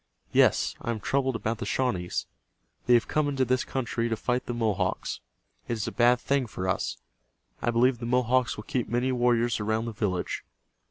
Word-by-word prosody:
Yes, - - +4
I - - -4
am 115 -2 -1
troubled 135 +3 0
about 115 0 -2
the 120 - -3
Shawnees. 95 -10 -1 0.6
They 120 - +7
have 115 - +2
come 150 -1 +1
into 135 -2 +1
this 130 +1 +1
country 120 -2 -2
to 115 - 0
fight 125 +3 -1
the 120 - -2
Mohawks. 100 -5 -1 0.5
It - - -1
is 110 -3 -2
a - - -2
bad 120 0 +4
thing 140 -1 0
for 95 -3 -4
us. 95 - -1 0.6
I - - +1
believe 120 +1 +3
the 115 - -4
Mohawks 125 0 +2
will 105 - -6
keep 125 +1 -2
many 125 +2 +1
warriors 120 -2 +2
around 110 +2 0
the 115 - -3
village. 100 -4 -2
120 Hz, 195 wpm, -27 LUFS, 110-125 Hz, 0.6 s, They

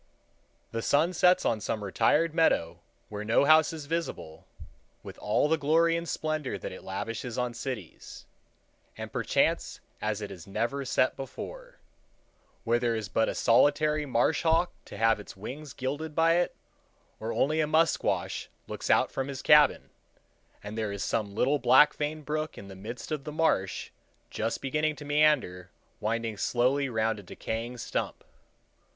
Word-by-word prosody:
The 115 - -3
sun 155 +9 +2
sets 180 +1 +4
on 110 -2 +1
some 105 0 -3
retired 150 - +2
meadow, 85 - +2 0.3
where 105 0 -5
no 110 +6 +3
house 155 +1 +6
is 155 -3 -7
visible, 160 - -4 0.6
with - - -10
all - - +1
the 160 0 +1
glory 165 +3 +3
and 170 0 -3
splendor 155 -3 -2
that - - -6
it 95 - -10
lavishes 115 +5 -5
on 125 -1 -1
cities, 120 - -7 0.7
and - - -7
perchance - - 0 0.2
as 105 -1 -1
it 105 -1 -6
has 90 -3 -10
never 120 +7 -2
set 130 0 +1
before,—where - - -7
there 120 -1 0
is 110 -3 -4
but 110 +5 +1
a - - -3
solitary 150 +5 +3
marsh 130 +4 +2
hawk 165 +2 +2
to - - -10
have 115 -1 +3
his 105 - -11
wings 135 +8 -7
gilded 145 +5 -4
by 165 +1 +4
it, 175 - 0 0.6
or 110 +1 -3
only 155 +6 +1
a 150 - +1
musquash 160 +1 +1 0.2
looks - - -6
out - - +4
from 135 0 -3
his 140 -1 -6
cabin, 150 -1 +5 0.7
and 105 +1 -7
there 110 -2 -2
is 100 -1 -4
some 100 -2 -2
little 140 +6 +2
black 130 +5 +6
veined 150 0 -4
brook 155 +1 -3
in 100 - -10
the 95 - -9
midst 115 +9 -8
of 150 -3 -2
the 150 - -6
marsh, 150 - 0 0.4
just 115 +1 -3
beginning 150 +3 0
to 145 +1 -10
meander, 145 -12 +2 0.3
winding 115 0 -2
slowly 130 +6 +1
round 110 -2 0
a - - -8
decaying 115 +5 -5
stump. - - -4
130 Hz, 160 wpm, -28 LUFS, 110-155 Hz, 0.7 s, house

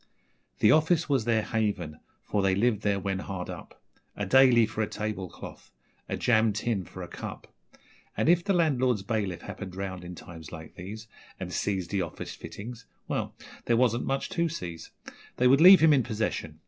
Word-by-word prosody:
The 105 - +6
office 160 +2 +3
was 135 -6 +1
their 115 -2 +2
haven, 100 -10 -2 0.2
for 105 - -1
they 95 -1 +2
lived 105 0 +1
there 100 -2 +1
when 95 -1 -2
hard 95 -2 -5
up - - -11 0.4
A 105 - -2
'daily' 125 +1 +6
for 110 0 -4
a 105 - 0
table 105 -4 -4
cloth - - -11 0.4
a - - -2
jam 110 -3 +3
tin 105 -2 -2
for - - -9
a - - -7
cup; - - -8 0.7
And - - +1
if 175 +1 +4
the 200 - 0
landlord's 130 - +2
bailiff 100 -4 -2
happened 95 -3 -7
round 95 -2 -5
in 90 0 -8
times 80 -2 -11
like 80 -1 -9
these 105 +5 -8 0.3
And - - -5
seized 95 -4 -2
the 100 -2 0
office 85 -3 -6
fittings 115 +3 -9 0.2
well, - - -3 0.3
there 115 - +2
wasn't 120 -1 +2
much 135 0 -1
to 170 -1 0
seize 85 - -7 0.5
They 125 - +2
would 135 +4 +5
leave 185 +1 +10
him 160 -1 +6
in 135 - +4
possession. 105 -9 -3
110 Hz, 185 wpm, -28 LUFS, 95-125 Hz, 0.7 s, leave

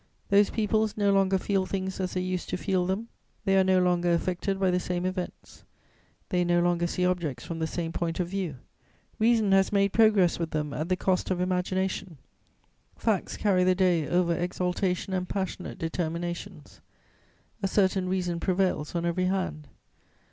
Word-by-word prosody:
Those 200 0 +5
peoples 215 0 0
no 200 -1 +3
longer 195 -1 +3
feel 190 0 0
things 190 0 -3
as 185 -1 -3
they 185 - 0
used 185 -1 -3
to - - -1
feel 185 -1 0
them; 210 +5 -2 0.4
they 195 - +3
are 190 - +5
no 190 0 +3
longer 175 -1 +2
affected 185 +3 -1
by 190 -1 +2
the 180 - +2
same 180 0 -2
events; 185 -1 -5 0.7
they 180 -2 +1
no 175 0 +2
longer 175 0 +1
see 180 +1 -1
objects 165 -9 -1
from 165 -1 -5
the 160 - 0
same 165 0 -3
point 165 0 -2
of 180 - 0
view; 185 -5 -3 0.6
reason 220 -2 +3
has 195 0 +4
made 200 -1 +2
progress 210 -7 +4
with 165 -1 -2
them 150 -2 -2
at 155 +4 -3
the 185 - +3
cost 185 0 0
of 185 -2 0
imagination; 185 -1 -1 0.8
facts 215 -5 -1
carry 190 -3 +2
the 185 0 +3
day 175 -5 +2
over 175 -1 +2
exaltation 180 +2 -1
and 180 -1 -2
passionate 190 -2 -4
determinations; 170 +1 -4 0.8
a 195 - +1
certain 190 -1 +1
reason 180 -2 -1
prevails 180 -4 0
on 170 0 -1
every 175 +2 0
hand. 185 -5 -2
185 Hz, 175 wpm, -27 LUFS, 175-195 Hz, 0.8 s, Those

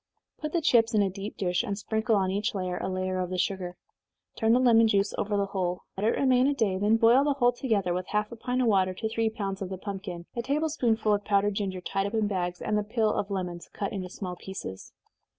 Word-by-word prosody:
Put 305 0 -4
the 340 - +2
chips 230 -5 +4
in 210 - +5
a 195 - 0
deep 200 +3 -7
dish, 180 -2 +1
and 205 -5 -3
sprinkle 220 +2 0
on 190 -2 +1
each 205 +3 -1
layer 185 -2 -2
a - - -3
layer 185 0 -2
of 180 -1 -2
the 185 - -3
sugar. 180 -1 -2 0.6
Turn 225 -1 +2
the 245 - +5
lemon 230 -3 +5
juice 200 -2 +2
over 205 0 -1
the 200 - +1
whole. 185 -2 -2
Let 205 +3 0
it - - +1
remain 260 -1 +4
a 285 - +1
day 200 -7 +1
then 210 +3 +3
boil 235 +4 +5
the 290 0 +2
whole 245 -3 +4
together, 220 -8 0
with 180 +1 -3
half 210 +1 -1
a - - -6
pint 250 +2 -1
of - - +2
water 190 -3 +2
to 220 - -2
three 225 0 0
pounds 200 -3 -4
of 190 - -3
the 190 - -5
pumpkin, 190 -3 -6
a 235 - -1
table 295 +6 0
spoonful 230 -7 +1
of 205 0 0
powdered 205 0 +2
ginger, 195 -2 -3
tied 195 +2 -1
up 210 - -4
in 220 -1 +2
bags, 180 -3 -2
and 210 0 +1
the - - -1
peel 215 0 +1
of 200 - -1
the 200 - -5
lemons, 175 -2 -5
cut 200 - -3
into 185 -2 -4
small 180 -1 -6
pieces. 175 - -8
205 Hz, 255 wpm, -28 LUFS, 185-225 Hz, 0.6 s, in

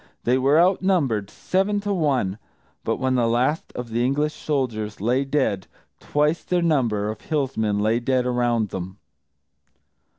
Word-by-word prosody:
They 125 +2 +2
were 140 +4 +4
outnumbered, 170 - +2
seven 195 +2 0
to 205 0 -1
one; 130 - 0 0.4
but - - 0
when 130 0 0
the 120 -2 +2
last 125 +7 0
of 120 -2 -6
the 120 +2 0
English 145 +4 +1
soldiers 115 -8 -2
lay 125 +6 +1
dead, 135 -9 0 0.3
twice 150 +3 0
their 180 -1 0
number 115 -10 +1
of 110 - -10
Hillsmen 125 -9 -1
lay 110 +3 +2
dead 125 +1 +1
around 120 -3 +1
them! 95 +2 -6
125 Hz, 145 wpm, -23 LUFS, 110-150 Hz, 0.4 s, were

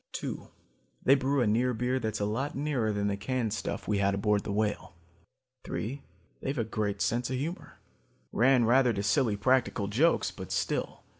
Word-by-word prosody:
"Two, - - -5 0.6
they 135 - +6
brew 140 0 +2
a - - +3
near 120 +4 +2
beer 125 +3 0
that's 110 -3 -2
a 100 - 0
lot 125 +8 -2
nearer 135 -6 0
than 100 -1 -1
the 100 -1 0
canned 115 +1 -2
stuff - - -4
we 105 -1 +1
had 100 0 +2
aboard 105 0 +1
the - - -4
Whale. 105 -3 -1 0.7
"Three, 135 +6 -4 0.4
they've 135 +2 -3
a 115 - +1
great 105 -2 -2
sense 120 +1 0
of 130 - -1
humor. 160 +7 -5 0.5
Ran 125 -1 +4
rather 125 +1 +4
to 100 -1 -2
silly 105 +1 +2
practical 120 -2 +1
jokes, 140 +12 +2
but - - -9
still. - - -2
115 Hz, 180 wpm, -29 LUFS, 105-130 Hz, 0.7 s, they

